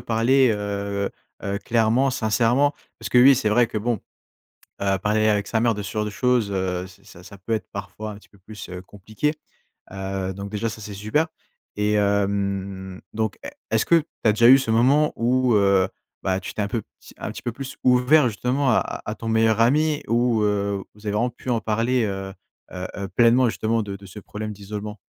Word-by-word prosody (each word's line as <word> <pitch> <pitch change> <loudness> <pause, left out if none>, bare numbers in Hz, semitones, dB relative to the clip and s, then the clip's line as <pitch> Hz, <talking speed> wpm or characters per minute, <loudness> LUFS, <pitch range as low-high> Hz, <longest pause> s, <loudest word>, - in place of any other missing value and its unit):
parler, 120 +3 +3
heu 100 -1 -3 0.3
heu, 100 0 -2
clairement, 115 +5 +2
sincèrement. 125 +4 +2 0.3
Parce - - -5
que 125 - +4
oui, 135 +2 +8
c'est 110 -4 0
vrai 120 +2 +4
que, 110 - -3
bon, 115 0 -1 0.8
heu, 95 -1 +1
parler 110 +2 +1
avec 105 -1 +1
sa 110 - 0
mère 115 0 +3
de 105 - -5
ce 100 - -6
genre 105 0 -1
de - - -3
choses, 120 -2 +1
heu, 95 -1 -2
ça 90 -1 -16
ça 100 +2 -12
peut 105 +4 -4
être 110 - -2
parfois 100 +2 -6
un - - -8
petit 105 - -17
peu 100 - -22
plus, 105 0 -10
heu, 90 0 -7
compliqué. 110 - -3 0.6
Heu, 95 -1 -4
donc 100 +1 -7
déjà, 110 +2 -2
ça, 110 0 -8
c'est 105 0 -7
super. 110 +11 0 0.5
Et 105 0 +1
hem, 100 -2 -1
donc, 110 -2 -2
e - - -4 0.2
est-ce 110 -1 +2
que 170 - +4
tu 155 - -1 0.2
as 110 - +6
déjà 115 +2 +4
eu 135 - +10
ce 130 -4 -2
moment 140 +7 +3
où, 125 0 +2
heu 100 -2 +4 0.4
bah, 95 0 0
tu - - -7
t'es 105 - -1
un - - -1
peu, 115 - -2
un - - -6
pe - - -11
un - - -4
petit - - -9
peu 120 - -2
plus 135 +2 -8
ouvert, 125 +3 +5
justement, 125 +6 0
à - - 0
à 105 - -3
ton 115 - -7
meilleur 110 0 +3
ami 150 +5 +3
ou, 120 -1 +2
heu, 100 -1 0
vous 105 +1 -17
avez 105 - -1
vraiment 120 +4 +1
pu 125 +2 -9
en 115 -2 +2
parler, 115 +3 +1
heu 95 -1 -4 0.4
heu 90 0 -5
heu, 100 -1 -4
pleinement, 120 +1 +4
justement, 110 0 0
de 100 -1 -6
de 100 0 -12
ce 95 +3 -10
problème 105 +1 -6
d'isolement? 105 +1 -7
110 Hz, 215 wpm, -23 LUFS, 100-120 Hz, 0.8 s, eu